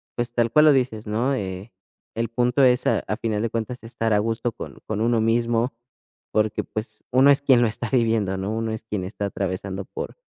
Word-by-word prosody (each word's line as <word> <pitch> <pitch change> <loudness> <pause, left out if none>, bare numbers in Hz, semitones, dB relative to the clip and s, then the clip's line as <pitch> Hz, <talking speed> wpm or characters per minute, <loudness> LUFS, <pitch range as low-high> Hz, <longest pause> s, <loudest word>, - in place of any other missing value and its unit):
pues, 120 0 -3
tal 120 -1 +1
cual 150 +3 +6
lo 155 - +8
dices, 120 -5 0
¿no?, 115 +6 0
eh, 95 -1 -5 0.4
el 115 0 -1
punto 125 +3 +2
es 125 -1 +4
a - - +3
al 105 - -4
final 110 -3 -1
de 115 - 0
cuentas 115 +2 -4
estar 115 -1 -1
a 105 - +4
gusto 115 +2 -1
con - - -9
con 110 -1 -3
uno 115 0 +2
mismo 115 +2 +1 0.6
porque, 105 0 +1
pues, 110 0 -7
uno 130 +3 +6
es 140 0 +3
quien 130 -4 +5
lo - - +4
está 115 +2 -5
viviendo, 110 -6 +1
¿no? 95 +2 -3
Uno 115 0 -2
es 110 - -6
quien 105 -4 -3
está 100 +1 -4
atravesando 95 0 -4
por - - -7
115 Hz, 215 wpm, -23 LUFS, 105-120 Hz, 0.6 s, lo